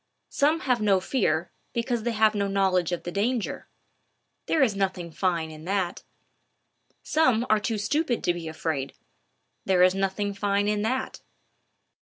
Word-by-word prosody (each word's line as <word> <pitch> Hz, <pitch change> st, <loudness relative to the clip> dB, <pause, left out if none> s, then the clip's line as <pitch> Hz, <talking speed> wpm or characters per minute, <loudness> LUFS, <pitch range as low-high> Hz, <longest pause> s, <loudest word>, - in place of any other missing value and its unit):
Some 310 Hz, +3 st, +2 dB
have 250 Hz, -3 st, +1 dB
no 200 Hz, -3 st, +4 dB
fear, 185 Hz, -, 0 dB, 0.2 s
because 235 Hz, 0 st, -1 dB
they 235 Hz, +2 st, -1 dB
have 215 Hz, 0 st, +4 dB
no 200 Hz, -1 st, 0 dB
knowledge 190 Hz, -3 st, +1 dB
of 175 Hz, -, -3 dB
the 175 Hz, -, -5 dB
danger: 220 Hz, +4 st, -2 dB, 0.8 s
there 310 Hz, -, +3 dB
is 220 Hz, -6 st, +1 dB
nothing 190 Hz, -3 st, -2 dB
fine 170 Hz, -2 st, -1 dB
in 155 Hz, 0 st, -11 dB
that. 190 Hz, -1 st, -1 dB, 1.0 s
Some 255 Hz, -7 st, +2 dB
are 215 Hz, -, +5 dB
too 225 Hz, 0 st, -2 dB
stupid 260 Hz, +4 st, 0 dB
to 175 Hz, -, +2 dB
be 170 Hz, -2 st, -6 dB
afraid: 155 Hz, -4 st, -3 dB, 0.7 s
there 185 Hz, -2 st, +3 dB
is 185 Hz, 0 st, +5 dB
nothing 195 Hz, +1 st, -1 dB
fine 200 Hz, 0 st, 0 dB
in 210 Hz, 0 st, +1 dB
that. 255 Hz, +5 st, -2 dB
200 Hz, 155 wpm, -26 LUFS, 180-230 Hz, 1.0 s, are